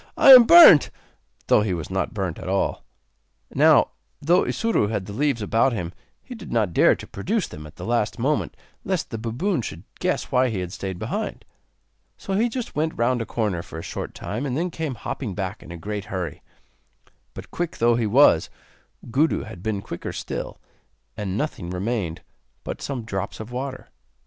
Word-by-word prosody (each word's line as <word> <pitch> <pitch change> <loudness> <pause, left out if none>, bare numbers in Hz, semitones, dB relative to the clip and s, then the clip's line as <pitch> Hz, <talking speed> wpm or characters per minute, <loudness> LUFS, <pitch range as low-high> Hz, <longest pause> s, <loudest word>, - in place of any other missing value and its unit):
I 275 - +8
am 250 -3 +11
burnt!' 310 - +9 0.6
though - - +4
he 100 -4 -1
was 85 +1 -6
not 95 - -1
burnt 95 -6 -3
at - - -6
all. 95 +1 -1 0.7
Now, - - +5 0.3
though 175 +5 +3
Isuro 225 - 0
had 105 -4 -2
the 100 - -8
leaves 135 -2 0
about 115 +5 +2
him, 90 -5 -4 0.3
he 255 - -9
did 215 -6 -10
not 110 -7 +1
dare - - +5
to - - -10
produce 205 - -2
them 75 0 -10
at 75 - -16
the - - -8
last 115 -1 0
moment 140 +5 -1 0.3
lest 185 -3 -2
the 115 - -4
baboon 125 - -1
should 85 -5 -7 0.2
guess 180 0 -1
why 130 -1 +3
he 110 - -3
had 90 0 -5
stayed 95 -2 -5
behind. - - -4 0.7
So 195 - -5
he 225 +5 +2
just 245 0 -5
went 160 +1 -1
round 120 +1 +1
a 115 - -4
corner 105 -8 -1
for 80 - -10
a 80 - -6
short - - -6
time, 110 +6 -4
and 135 -2 -2
then 175 +2 -1
came 160 -5 -4
hopping 105 -1 -5
back 95 0 -4
in - - -11
a 85 - -7
great 105 +3 -5
hurry. 90 -7 -5 0.9
But, - - -10
quick 175 -1 -3
though 120 +1 +3
he 115 -2 0
was, 110 - +5 0.6
Gudu 150 +6 +2
had 85 - -10
been 100 -1 -3
quicker - - -6
still, - - -5 0.6
and 100 -2 -3
nothing 125 - -3
remained 90 -2 -3 0.4
but - - -6
some 130 -5 -4
drops 100 -2 -4
of 110 +2 -8
water. 130 +1 -6
115 Hz, 190 wpm, -23 LUFS, 95-150 Hz, 0.9 s, am